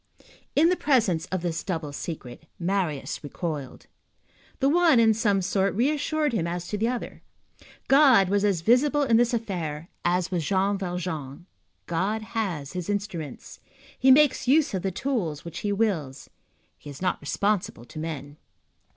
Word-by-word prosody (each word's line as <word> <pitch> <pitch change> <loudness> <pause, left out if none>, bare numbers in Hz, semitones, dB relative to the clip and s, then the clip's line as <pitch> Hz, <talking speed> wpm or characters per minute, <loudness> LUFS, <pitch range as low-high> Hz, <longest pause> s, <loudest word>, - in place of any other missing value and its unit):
In 320 +4 +5
the 365 - +3
presence 215 - +1
of 185 -2 -3
this 165 -2 -2
double 160 -6 -4
secret, 145 -2 -7
Marius 175 -7 -2
recoiled. 145 -3 -5 0.7
The 270 - +2
one, 325 -3 +5
in 225 -1 +5
some 205 -3 +1
sort, 195 +1 0
reassured 295 +3 0
him 175 -7 0
as 175 +1 -4
to 210 - -2
the 225 - +1
other. 245 0 -4 0.7
God 270 -8 +6
was 200 +2 +1
as 195 -5 +1
visible 280 - +3
in 235 -4 +4
this 240 +1 +3
affair 175 -9 -3
as 180 +1 +1
was 175 -3 -1
Jean 195 +5 +1
Valjean. 175 -5 -5 0.4
God 195 +6 -1
has 195 -11 -3
his 180 0 -5
instruments. 195 -7 -5 0.4
He 265 - +4
makes 270 -2 +5
use 295 +1 +3
of 190 - -1
the 195 - -1
tool 195 - -2
which 170 - -7
he 205 - -2
wills. 185 -11 -2 0.5
He 145 - -11
is 140 +5 -9
not 180 - 0
responsible 200 - -1
to 155 - -9
men. 150 -2 -6
195 Hz, 160 wpm, -26 LUFS, 165-235 Hz, 0.7 s, God